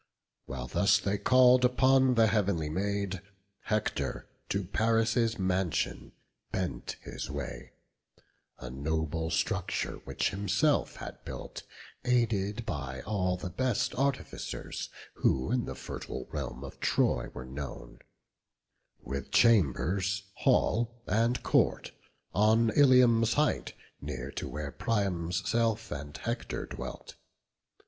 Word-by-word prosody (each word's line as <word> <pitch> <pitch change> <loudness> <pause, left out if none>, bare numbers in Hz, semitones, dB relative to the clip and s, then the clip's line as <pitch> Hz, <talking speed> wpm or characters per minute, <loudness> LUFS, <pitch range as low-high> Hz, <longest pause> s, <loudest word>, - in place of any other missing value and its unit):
While 65 -2 -5
thus - - +3
they 100 0 -1
call'd 125 0 +6
upon 130 +1 +4
the 115 -1 +6
heav'nly 100 -8 +1
Maid, 100 +1 -1 0.4
Hector 105 -1 -1 0.2
to 100 0 0
Paris' 115 +3 +1
mansion 95 -2 -1 0.4
bent 85 -10 -3
his - - -6
way; - - -6 0.8
A 60 - -8
noble 80 +4 -2
structure, 80 - -1
which - - 0
himself 100 +9 +1
had - - -9
built - - -7 0.4
Aided 115 -3 +1
by 65 - -4
all 95 -3 0
the 90 0 -6
best 130 +3 0
artificers 135 0 -3 0.3
Who 65 - +1
in 125 -2 +1
the - - -5
fertile - - -6
realm 65 +3 -4
of 70 - -9
Troy - - +1
were 65 - -8
known; 65 0 -7 1.0
With 70 +1 -5
chambers, 100 - +3
hall, 120 +1 +1
and 115 +3 +1
court, - - +2 0.4
on 110 +2 +4
Ilium's 125 -5 +5
height, 150 +1 +1 0.3
Near - - -5
to - - -5
where 75 -1 -5
Priam's 90 - -1
self 115 -1 +1
and 75 0 -6
Hector 115 +1 -3
dwelt. - - -8
100 Hz, 115 wpm, -30 LUFS, 80-115 Hz, 1.0 s, call'd